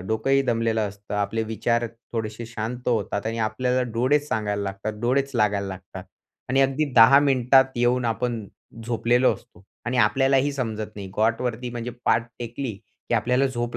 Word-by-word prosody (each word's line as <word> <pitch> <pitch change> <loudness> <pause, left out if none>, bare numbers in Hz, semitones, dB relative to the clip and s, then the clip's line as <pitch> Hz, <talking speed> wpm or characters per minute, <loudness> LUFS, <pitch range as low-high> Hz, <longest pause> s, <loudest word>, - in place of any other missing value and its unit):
डोकंही 135 +5 +2
दमलेलं 115 -3 0
असतं. 100 +1 -9
आपले 105 +2 -1
विचार 115 +2 0 0.3
थोडेसे 110 0 -4
शांत 115 +2 -5
होतात 105 -3 -1
आणि 115 +1 -2
आपल्याला 125 +4 0
डोळेच 140 +5 +2
सांगायला 105 -2 -1
लागतात, 100 +2 -4
डोळेच 135 +4 +1
लागायला 105 -3 +1
लागतात. 95 -1 -8 0.4
आणि 135 +2 +2
अगदी 135 +3 +1
10 125 +5 +9
मिनिटात 130 -1 +4
येऊन 120 +1 +2
आपण 115 -1 -2 0.4
झोपलेलो 120 +2 +2
असतो, 100 -6 -18 0.2
आणि 125 +1 -2
आपल्यालाही 135 +5 +3
समजत 110 -5 -4
नाही. 95 -2 -7
कॉटवरती, 115 +2 0
म्हणजे 120 0 -5
पाठ 115 +1 +2
टेकली, 120 +1 -4 0.4
की - - +1
आपल्याला 125 +4 +2
झोप 120 -2 -3
115 Hz, 155 wpm, -24 LUFS, 110-125 Hz, 0.4 s, 10